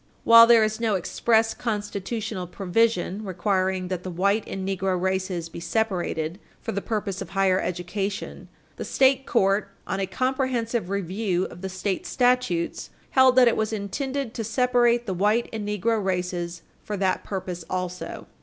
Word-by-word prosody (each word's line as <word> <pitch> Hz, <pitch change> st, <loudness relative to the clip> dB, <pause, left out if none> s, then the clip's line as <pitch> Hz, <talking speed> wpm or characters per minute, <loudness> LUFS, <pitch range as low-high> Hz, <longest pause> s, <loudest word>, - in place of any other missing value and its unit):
While 230 Hz, 0 st, +9 dB
there 230 Hz, -2 st, +7 dB
is 215 Hz, +1 st, -1 dB
no 225 Hz, -3 st, +1 dB
express 225 Hz, +4 st, +1 dB
constitutional 210 Hz, -2 st, -3 dB
provision 200 Hz, +1 st, 0 dB
requiring 185 Hz, -1 st, 0 dB
that 185 Hz, -2 st, -3 dB
the 185 Hz, -, -6 dB
white 200 Hz, +5 st, +1 dB
and 190 Hz, 0 st, -4 dB
negro 190 Hz, -1 st, 0 dB
races 185 Hz, -2 st, -1 dB
be 165 Hz, -, -9 dB
separated 175 Hz, -4 st, -1 dB, 0.2 s
for -, -, -4 dB
the 200 Hz, -, -2 dB
purpose 205 Hz, -3 st, -3 dB
of -, -, -6 dB
higher 190 Hz, -1 st, +2 dB
education, 190 Hz, +3 st, -4 dB, 0.3 s
the -, -, -4 dB
state 265 Hz, 0 st, +3 dB
court, 195 Hz, -2 st, +2 dB, 0.2 s
on 190 Hz, -, -2 dB
a 195 Hz, -, -1 dB
comprehensive 250 Hz, -5 st, -1 dB
review 190 Hz, -1 st, -1 dB
of 175 Hz, -, -10 dB
the 190 Hz, -, -4 dB
state 190 Hz, +1 st, -3 dB
statutes, 245 Hz, -9 st, +1 dB, 0.2 s
held 260 Hz, -1 st, +5 dB
that 255 Hz, -1 st, +7 dB
it 235 Hz, -, +3 dB
was 220 Hz, 0 st, -1 dB
intended 260 Hz, +5 st, -3 dB
to 225 Hz, -, -3 dB
separate 240 Hz, +1 st, +2 dB
the 195 Hz, -, -2 dB
white 210 Hz, +6 st, +2 dB
and 215 Hz, -2 st, -4 dB
negro 210 Hz, +1 st, 0 dB
races 180 Hz, -2 st, -2 dB, 0.2 s
for 210 Hz, -, -4 dB
that 190 Hz, -1 st, 0 dB
purpose 185 Hz, -3 st, -5 dB
also. 180 Hz, 0 st, -4 dB
200 Hz, 160 wpm, -25 LUFS, 185-230 Hz, 0.3 s, While